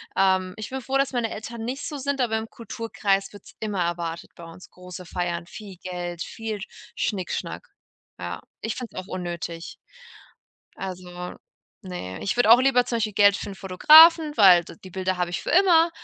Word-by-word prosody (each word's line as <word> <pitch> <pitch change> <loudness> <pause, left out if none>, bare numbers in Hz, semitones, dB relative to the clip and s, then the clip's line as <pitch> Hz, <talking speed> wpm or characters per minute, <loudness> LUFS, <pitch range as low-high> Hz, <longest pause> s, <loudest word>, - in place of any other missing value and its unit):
ähm 190 -1 +2
ich 215 - -6
bin 265 0 -5
froh, 270 +2 -1
dass 275 0 +1
meine 235 -2 0
Eltern 225 +1 -7
nicht 260 +3 -4
so 295 - -5
sind, 280 0 -2
aber 225 -2 +1
im 220 0 -5
Kulturkreis 205 -4 -2
wird's 205 - -14
immer 205 -5 -1
erwartet 170 -1 -4
bei 170 - -12
uns, 165 +3 -13
große 180 0 -11
Feiern, 175 -1 -3
viel 200 0 -10
Geld, 175 -1 -6
viel 220 -2 -6 0.4
Schnickschnack. 205 - -3 0.5
Ja, - - -5 0.2
ich 225 - -3
finde 250 -3 -8
es 185 - -4
auch - - -19
unnötig. 175 -2 -6 1.0
Also, 180 -1 -7 0.5
ne, 135 - -7
ich 200 - -1
würde 245 -2 +4
auch 245 +2 +9
lieber 255 -2 +3
zum 235 - -2
Beispiel 215 -3 -2
Geld 200 -1 +5
für - - -6
'n 195 - -7
Fotografen, 305 - +7
weil 185 -5 +7
d - - -11
die 185 - -10
Bilder 185 0 -2
habe 175 -1 -1
ich - - -3
für - - -4
immer, 340 -1 +5
195 Hz, 185 wpm, -24 LUFS, 180-240 Hz, 1.0 s, auch